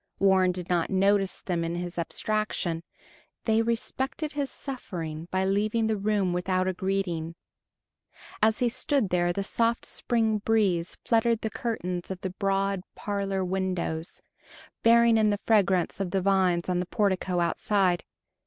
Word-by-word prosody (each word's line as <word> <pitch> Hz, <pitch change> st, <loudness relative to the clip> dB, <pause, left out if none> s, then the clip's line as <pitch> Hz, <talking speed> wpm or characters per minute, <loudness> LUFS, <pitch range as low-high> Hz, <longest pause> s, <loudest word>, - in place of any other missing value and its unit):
Warren 190 Hz, -2 st, +4 dB
did 180 Hz, -1 st, -6 dB
not 175 Hz, -2 st, +1 dB
notice 195 Hz, 0 st, +2 dB
them 175 Hz, -3 st, -1 dB
in 165 Hz, +1 st, -2 dB
his 175 Hz, 0 st, -4 dB
abstraction; 180 Hz, -2 st, -1 dB, 0.6 s
they 220 Hz, -1 st, +3 dB
respected 260 Hz, +6 st, -2 dB
his 285 Hz, -2 st, -2 dB
suffering 170 Hz, -, -6 dB
by 190 Hz, +1 st, 0 dB
leaving 210 Hz, +4 st, +1 dB
the 220 Hz, 0 st, +1 dB
room 200 Hz, -3 st, 0 dB
without 185 Hz, +1 st, 0 dB
a 185 Hz, -, 0 dB
greeting. 175 Hz, -4 st, -2 dB, 1.1 s
As 220 Hz, +1 st, +4 dB
he 245 Hz, -, +2 dB
stood 255 Hz, -2 st, +1 dB
there 175 Hz, -1 st, +2 dB
the 195 Hz, +3 st, -2 dB
soft 230 Hz, +3 st, 0 dB
spring 225 Hz, -3 st, 0 dB
breeze 200 Hz, -6 st, +1 dB
fluttered 230 Hz, 0 st, +2 dB
the 220 Hz, -, -2 dB
curtains 180 Hz, -7 st, -3 dB
of 190 Hz, -1 st, -5 dB
the 190 Hz, -, -3 dB
broad 195 Hz, 0 st, 0 dB
parlor 195 Hz, -2 st, -2 dB
windows, 180 Hz, -3 st, -2 dB, 0.6 s
bearing 235 Hz, 0 st, +5 dB
in 215 Hz, -1 st, +4 dB
the 205 Hz, -1 st, 0 dB
fragrance 195 Hz, -6 st, +2 dB
of 195 Hz, -2 st, -1 dB
the 195 Hz, +1 st, 0 dB
vines 185 Hz, -3 st, +2 dB
on 180 Hz, -1 st, 0 dB
the 180 Hz, -, -2 dB
portico 190 Hz, -4 st, 0 dB
outside. 180 Hz, +1 st, +1 dB
195 Hz, 150 wpm, -27 LUFS, 180-220 Hz, 1.1 s, bearing